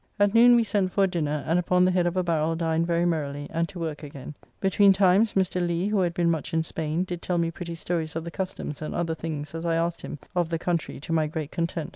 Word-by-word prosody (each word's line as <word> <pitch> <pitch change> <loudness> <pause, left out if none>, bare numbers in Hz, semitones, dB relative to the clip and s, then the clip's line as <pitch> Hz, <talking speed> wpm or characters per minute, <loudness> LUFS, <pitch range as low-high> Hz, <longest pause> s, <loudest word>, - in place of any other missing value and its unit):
At 205 0 +3
noon 240 +1 +7
we 235 - +4
sent 200 -3 0
for 200 - +2
a - - +4
dinner, 150 -5 -2
and 165 +3 +2
upon 180 +1 +3
the 185 - +3
head 180 -1 +2
of 175 +1 -2
a 185 - +2
barrel 165 -1 0
dined 165 0 0
very 170 0 +1
merrily, 145 -4 -1
and 165 +1 -1
to 190 - -10
work 160 -3 -4
again. 145 -1 -8 0.3
Between 195 0 +5
times, 195 +3 +4
Mr. 185 -2 +1
Lee, 175 +3 0
who 210 -1 +1
had 175 -2 0
been 170 -1 +2
much 160 +1 -3
in 160 - +2
Spain, 160 +1 -2
did 175 -2 -5
tell 180 - -1
me 165 -1 +1
pretty 170 0 -6
stories 165 -2 -3
of 165 - -2
the 170 - -6
customs 180 -5 -5
and 155 - -4
other 170 -1 -1
things, 155 -2 -5
as 165 0 -5
I 165 -1 +1
asked 170 +1 -1
him, 150 - -6 0.2
of 175 -2 +1
the 165 - -1
country, 170 -4 -2
to 165 - -4
my 160 -1 +2
great 155 -1 -5
content. 165 -1 -2
170 Hz, 265 wpm, -26 LUFS, 160-180 Hz, 0.3 s, noon